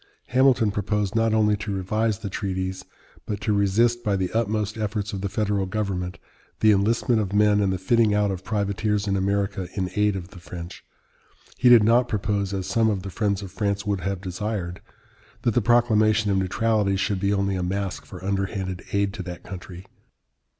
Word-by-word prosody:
Hamilton 125 -3 +4
proposed 105 0 -1
not 115 0 +2
only 105 -1 +3
to 105 0 -5
revise 110 +3 0
the 105 -1 -6
treaties, 95 -2 -3 0.4
but 105 -2 -3
to 105 +1 +1
resist 115 +4 +2
by 105 -3 +1
the 95 -2 -1
utmost 110 -2 0
efforts 105 -1 -3
of 95 - -4
the 100 - -2
federal 100 -2 0
government 95 -3 -3 0.4
the 110 - +6
enlistment 110 +3 +2
of 100 -2 -3
men 105 0 +4
and 100 -2 +2
the 95 - -1
fitting 110 +4 +3
out 105 -1 +2
of 95 -1 -5
privateers 105 0 -1
in 100 -1 0
America 100 -1 -1
in 95 -3 -2
aid 105 -1 +2
of 90 -1 -6
the 95 - -12
French. 85 0 -9 0.7
He 125 - +4
did 120 -3 +8
not 120 +3 +4
propose, 100 -2 -1
as 95 -2 -3
some 115 +1 +2
of 100 -3 -2
the 100 - -6
friends 100 0 -1
of 95 - -8
France 100 -1 -2
would 100 -2 -1
have 95 0 -3
desired, 95 -1 -4 0.6
that 120 - +2
the 120 - +3
proclamation 110 -2 +3
of 95 - +2
neutrality 100 +1 +1
should 100 0 0
be 100 +1 +1
only 100 -1 0
a 90 - -2
mask 90 -4 -3
for 75 - -10
underhanded 95 -2 -2
aid 100 -1 +1
to 105 - -5
that 90 -1 -7
country. 90 -1 -9
100 Hz, 190 wpm, -24 LUFS, 95-110 Hz, 0.7 s, did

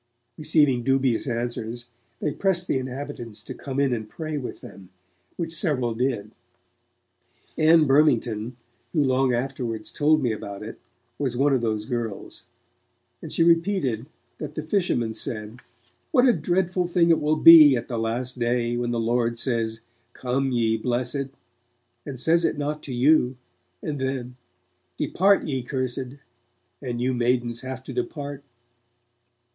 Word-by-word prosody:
Receiving 150 -5 +2
dubious 135 -2 +1
answers, 120 -1 -3 0.3
they 150 - -1
pressed 185 +1 0
the 130 - +1
inhabitants 130 -4 -7
to - - -7
come 135 -1 -5
in 140 -3 +2
and 110 -2 -4
pray 155 -2 -5
with 135 -4 -5
them, 95 -2 -12 0.5
which 165 -2 -3
several 135 - 0
did. 120 -2 -2 1.2
Ann 160 0 +5
Burmington, 125 -5 +2 0.4
who 155 -4 +3
long 130 -1 +2
afterwards 120 -3 -3
told 155 0 +2
me 120 - +1
about 100 -1 -6
it, 110 - -8 0.4
was 130 -4 -1
one 140 +2 +3
of 130 - +2
those 110 -2 -1
girls, 120 -5 -5 0.8
and - - -8
she 165 - +2
repeated 165 - +2 0.3
that 150 -1 -6
the 155 - -3
fishermen 155 - 0
said, 110 +1 -6 0.5
'What 260 -3 +4
a 245 - +6
dreadful 180 +1 0
thing 170 -1 +3
it 165 - +3
will 150 +1 +2
be, 155 -4 +9
at 120 - -3
the 120 -2 -3
Last 120 +3 -2
Day, 120 0 0
when 120 0 -1
the 120 -1 -1
Lord 115 0 0
says, 115 -2 -2 0.3
"Come, 130 +1 -1
ye 115 -2 +1
blessed", 125 +4 -2 0.8
and 135 -3 -6
says 165 +5 +2
it - - 0
not 150 +1 -3
to 140 - -6
you, 130 0 +3 0.5
and 145 -3 -3
then, 130 -2 -3 0.6
"Depart 195 +2 +3
ye 135 -3 -2
cursed", 130 0 -3 0.7
and 120 -3 -4
you 130 +1 0
maidens 120 -1 0
have 130 0 -6
to - - -8
depart.' 145 - -4
130 Hz, 150 wpm, -24 LUFS, 120-150 Hz, 1.2 s, be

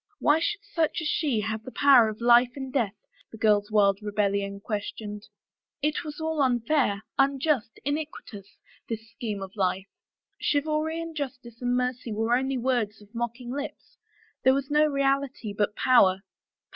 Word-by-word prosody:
Why 300 -3 +3
should 415 +5 -2
such 340 -7 -1
as 315 - -2
she 285 -8 +1
have 220 +1 -3
the 255 - -8
power 260 -6 +6
of 215 +1 -8
life 240 +1 +5
and 265 -2 -6
death, 225 -7 0 0.4
the 225 - -10
girl's 210 -1 +3
wild 200 -2 +3
rebellion 200 -1 -1
questioned. 210 0 -5 0.6
It 300 0 0
was 300 -1 -7
all 320 -1 -1
unfair, 245 -4 +1 0.2
unjust, 275 -3 +1
iniquitous, 285 -9 -5 0.3
this 225 -1 -5
scheme 215 -4 -4
of 190 +1 -10
life! 190 -1 0 0.5
Chivalry 310 +2 0
and 330 -1 -6
justice 255 -5 -6
and 245 0 +1
mercy 250 -1 -2
were 225 +3 +1
only 265 +1 0
words 240 -4 0
of 210 +1 -19
mocking 240 +1 -4
lips. 285 +2 -7 0.5
There 260 0 +5
was 275 +1 -3
no 300 +1 +5
reality 275 -5 0
but 205 0 0
power. 195 -7 +4
245 Hz, 160 wpm, -27 LUFS, 210-280 Hz, 0.6 s, power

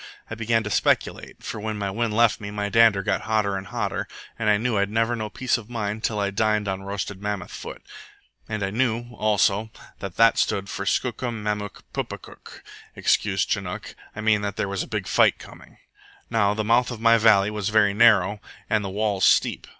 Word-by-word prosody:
I - - -2
began 115 0 0
to 105 - -5
speculate, - - 0
for - - -5
when 110 0 -4
my 100 -1 -2
wind 110 +1 -1
left 115 -2 +3
me 100 - -5
my 105 0 -3
dander 110 -3 +4
got - - 0
hotter 110 -4 0
and 95 0 -5
hotter, - - -3 0.3
and 110 -2 +1
I 105 - +4
knew 115 +1 -1
I'd 100 0 +1
never 115 +2 +1
know 110 -2 -4
peace 125 +2 -1
of 110 0 -13
mind 110 -2 -3
till 105 -2 -1
I 100 -1 0
dined 105 0 +1
on 95 0 -2
roasted 100 0 -5
mammoth 105 -1 -4
foot. - - -8 0.7
And 110 -2 -3
I 95 - -2
knew, 120 +1 -1
also, 105 -1 +1 0.3
that 95 -3 -7
that 115 0 +5
stood 100 0 0
for 100 - -5
SKOOKUM 120 -2 -1
MAMOOK 105 -1 -4
PUKAPUK - - -7 0.3
excuse - - +1
Chinook, - - -4 0.2
I 105 - -5
mean 110 -1 +3
there 100 -1 -2
was 100 -1 -2
a - - -5
big - - -3
fight - - +3
coming. - - -14 0.5
Now 105 -3 +2
the 110 - -1
mouth 120 +3 +3
of 120 -3 -6
my 115 0 +5
valley 105 -2 +4
was 105 -1 -2
very 105 -2 +3
narrow, 105 -2 +4 0.3
and 110 -1 +2
the 100 - -4
walls 100 -1 -1
steep. - - +3
105 Hz, 200 wpm, -24 LUFS, 100-115 Hz, 0.7 s, that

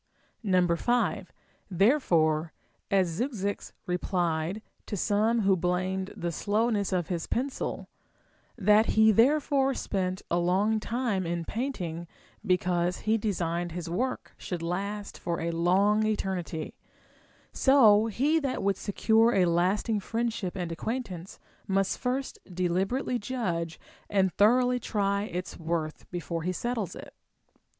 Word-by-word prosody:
5. 185 +7 +1 0.4
Therefore, 170 - +2 0.4
as 195 -3 +3
Zeuxis 215 -6 -2
replied 180 +1 -1 0.2
to 205 - -3
some 220 +4 +2
who 195 -1 +4
blamed 185 +2 -1
the 170 0 -2
slowness 210 +3 0
of 180 -3 -1
his 170 -3 -2
pencil, 260 +3 -3 0.4
— - - -37
that 215 +2 +6
he 220 0 +7
therefore 270 +3 +3
spent 185 -2 -2
a 170 - +2
long 195 +5 +2
time 225 -5 -1
in 170 0 -2
painting, 180 -10 -4 0.4
because 180 -1 +1
he 215 +1 +2
designed 175 -5 -1
his 170 -1 -5
work 255 +9 -2
should 175 -3 -5
last 200 +4 -4
for 170 -1 -2
a 170 +1 -1
long 190 +6 +3
eternity, 185 -6 -3 0.5
— - - -33
so 225 -6 +7
he 285 +9 +2
that 275 -8 -2
would 200 0 +1
secure 225 +3 +2
a 185 -2 +4
lasting 185 +6 +1
friendship 225 -3 -2
and 175 -3 -3
acquaintance 190 -1 -5 0.3
must 195 0 0
first 260 +2 -2
deliberately 190 +8 0
judge 175 -9 -3 0.3
and 190 -2 +2
thoroughly 250 +4 +4
try 200 -3 0
its 180 -3 -5
worth, 160 -1 -3
before 170 -2 -4
he 180 +3 -1
settles 225 0 -3
it. - - -10
195 Hz, 125 wpm, -28 LUFS, 175-225 Hz, 0.5 s, he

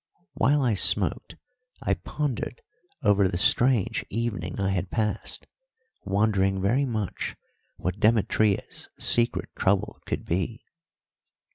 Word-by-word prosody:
While 140 +4 +2
I 120 -3 +2
smoked 100 - +2 0.5
I - - +2
pondered 150 - -4 0.4
over 100 -1 +4
the 90 - -2
strange 120 +3 +3
evening 105 -6 -3
I 95 -1 +1
had 95 -1 -2
passed, 110 -1 -1 0.6
wondering 95 -1 +1
very 120 +9 +2
much 110 -6 -3 0.4
what 90 +3 -3
Demetria's 110 -2 +1
secret 120 0 +2
trouble 95 0 0
could - - -3
be. 95 +7 -2
105 Hz, 110 wpm, -26 LUFS, 95-115 Hz, 0.6 s, over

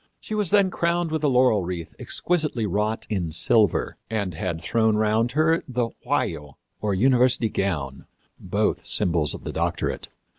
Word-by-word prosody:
She - - -8
was 210 -4 0
then 200 -2 +3
crowned 170 -1 0
with 155 -1 -2
a - - +3
laurel 125 -6 +3
wreath 85 -2 -5
exquisitely 150 -10 0
wrought 105 +3 -1
in 90 -7 -2
silver, 105 +4 +2
and 100 -5 -2
had 85 0 -3
thrown 110 +5 +1
round 110 +3 +1
her 160 +2 +2
the 125 -2 -1
vajo, 75 -2 -2 0.2
or 105 -2 0
university 125 +1 +3
gown, 75 -11 -3 0.3
both - - -1
symbols 85 -4 +2
of - - -11
the - - -5
doctorate. - - -2
110 Hz, 155 wpm, -24 LUFS, 90-135 Hz, 0.3 s, then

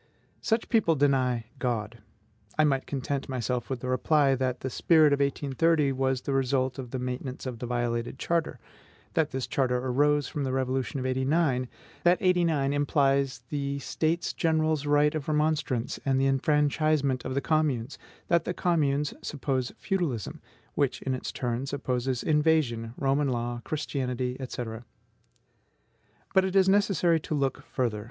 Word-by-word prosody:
Such 225 +1 0
people 215 -8 +3
deny 130 -5 +2
God. 115 -4 -2 0.6
I 155 - +5
might 135 -3 +1
content 140 0 -3
myself 125 -1 -2
with 130 -3 -3
the 125 - -4
reply 140 +2 +3
that 130 -1 -1
the 130 - -3
spirit 155 -1 +4
of 140 - +1
1830 140 +2 +1
was 130 -1 0
the 140 - -3
result 130 -1 0
of 125 -2 -6
the 130 - -4
maintenance 125 +1 -5
of 125 -3 -5
the 125 - -4
violated 120 0 -2
charter; 170 +1 -1 0.5
that 160 -2 +2
this 130 -1 -3
charter 125 -2 0
arose 145 +3 +2
from 145 - -3
the 130 - -1
Revolution 130 0 -1
of 130 - -4
'89; 130 0 +1 0.4
that 175 +1 +5
'89 170 -7 +2
implies 140 -3 +1
the 140 -1 -2
States 160 +4 -1
General's 155 -2 +1
right 145 0 +4
of 155 -3 -4
remonstrance, 150 -5 0
and 135 -1 +1
the 135 - +2
enfranchisement 145 -1 +2
of 130 - -4
the - - +2
communes; 140 -4 0 0.3
that 170 -1 +3
the 180 - -3
communes 150 -4 +1
suppose 130 -3 -2
feudalism, 165 - -2 0.3
which 140 -3 0
in 135 - -1
its 130 - -4
turn 125 +1 -3
supposes 130 -2 -2
invasion, 150 -7 +1
Roman 140 +1 +1
law, 120 -1 -2
Christianity, 130 -4 -2
&c. 125 - -4 1.7
But 190 -1 +5
it 190 0 -2
is 190 -1 +5
necessary 190 -4 +3
to 155 - -4
look 135 -2 -1
further. 120 -5 -1
135 Hz, 155 wpm, -28 LUFS, 130-155 Hz, 1.7 s, I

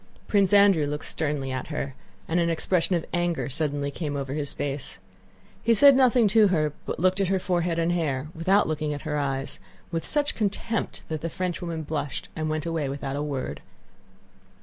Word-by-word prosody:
Prince 200 -2 +3
Andrew 200 -7 +5
looked 150 +1 -3
sternly 145 -4 -2
at 130 0 -3
her 145 -3 -3 0.3
and 165 +2 +1
an 170 0 +2
expression 175 +2 +1
of 170 - -1
anger 175 -4 0
suddenly 145 0 -1
came 145 -1 -4
over 135 -1 -3
his 145 -1 -2
face. 140 -7 -3 0.6
He 230 0 +3
said 280 +4 +8
nothing 250 -3 +5
to 215 0 +6
her 155 -5 +1
but - - -3
looked 185 +3 +2
at 195 - +2
her 190 +1 +2
forehead 175 -2 0
and 165 +1 +1
hair, 150 -5 -1
without 190 +5 +3
looking 155 -1 -1
at 145 - -8
her 150 -1 -1
eyes, 135 -1 -2 0.3
with 165 -2 -2
such 295 -1 +1
contempt 215 +1 -2
that 155 -2 -4
the 165 - -2
Frenchwoman 170 -2 -3
blushed 150 -2 -4
and 155 -1 -2
went 155 0 -2
away 165 -4 -1
without 140 0 -4
a 145 - -2
word. 140 -3 -3
160 Hz, 190 wpm, -26 LUFS, 145-185 Hz, 0.6 s, said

